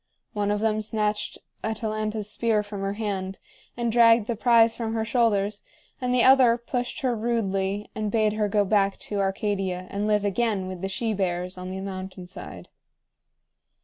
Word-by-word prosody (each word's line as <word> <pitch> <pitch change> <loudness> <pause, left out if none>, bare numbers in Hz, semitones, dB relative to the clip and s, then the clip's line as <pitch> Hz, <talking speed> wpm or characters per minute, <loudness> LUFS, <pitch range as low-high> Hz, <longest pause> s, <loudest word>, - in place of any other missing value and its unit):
One 205 -1 0
of 205 0 0
them 215 -1 +1
snatched 210 -1 -1 0.3
Atalanta's 215 -1 -2
spear 215 -1 +1
from 205 -1 -7
her 195 0 -1
hand, 195 -3 -3 0.4
and 235 -1 0
dragged 230 -1 +6
the 235 - -2
prize 230 0 +4
from 225 -1 -3
her 220 -1 0
shoulders, 215 -4 +1 0.4
and 250 0 0
the 250 -1 +4
other 255 -3 +6
pushed 245 +1 -3
her 255 -3 +1
rudely 205 -3 -1
and 215 -1 -2
bade 215 0 +2
her 215 -1 0
go 205 0 +2
back 195 -1 +2
to 205 - -4
Arcadia 195 -2 -1
and 205 +1 -1
live 210 -1 +2
again 205 -1 0
with 185 -1 -6
the 195 - -2
she 220 +3 -1
bears 180 -2 -2
on 185 0 -7
the 190 +1 -5
mountain 190 -1 -6
side. 180 - -10
210 Hz, 175 wpm, -25 LUFS, 195-225 Hz, 0.4 s, dragged